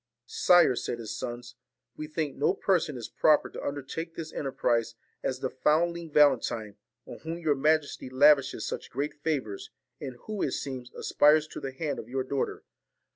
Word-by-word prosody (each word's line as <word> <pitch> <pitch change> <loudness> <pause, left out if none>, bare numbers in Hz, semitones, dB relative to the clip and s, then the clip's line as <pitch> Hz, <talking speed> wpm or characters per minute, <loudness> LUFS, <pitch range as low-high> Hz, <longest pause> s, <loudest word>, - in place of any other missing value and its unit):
'Sire,' 180 - +5
said 120 - -3
his 115 -2 -6
sons, 120 0 -6 0.4
'we 155 - -6
think 155 -2 -3
no 160 +7 +1
person 170 -8 +1
is 120 - -6
so - - -10
proper 155 -1 +4
to - - -7
undertake 145 +4 -5
this 160 -1 -6
enterprise 120 -4 0 0.3
as 130 0 -3
the - - -1
found 160 +6 +2
ling 170 -1 -7
Valentine, 125 -8 +3 0.3
on - - -9
whom 165 +1 -5
your 160 -4 +1
majesty 150 -1 +1
lavishes 140 +1 +4
such - - -5
great 140 +4 -3
favours, 145 -9 -3 0.3
and 130 -2 -6
who, 215 -2 -5
it - - 0
seems, 130 -3 -5
aspires 150 +1 +4
to - - -8
the 135 - -5
hand 145 +2 -3
of 110 - -9
your 130 +1 -1
daughter. 135 +1 -3
145 Hz, 180 wpm, -28 LUFS, 130-155 Hz, 0.4 s, Sire